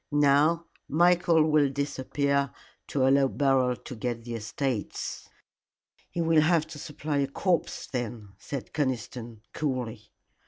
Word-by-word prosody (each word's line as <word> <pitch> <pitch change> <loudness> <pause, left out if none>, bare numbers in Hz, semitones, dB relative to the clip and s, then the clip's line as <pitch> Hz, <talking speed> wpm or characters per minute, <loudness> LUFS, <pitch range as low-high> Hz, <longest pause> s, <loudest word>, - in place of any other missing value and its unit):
Now 145 +3 +4 0.2
Michael 170 0 +4
will 150 -2 +4
disappear 140 0 0 0.4
to 135 -2 +1
allow 135 0 +5
Beryl 135 -2 +2
to 125 - -9
get 115 0 -3
the 120 0 -6
estates." 115 +1 -3 0.8
"He 170 - -2
will 165 -1 +4
have 160 0 +3
to 155 -2 -8
supply 150 0 -3
a 140 -1 +2
corpse 175 +5 -1
then," 115 -4 -5
said 140 -3 -6
Conniston, 120 -5 -3
coolly. 125 -7 -3
140 Hz, 125 wpm, -28 LUFS, 125-155 Hz, 0.8 s, allow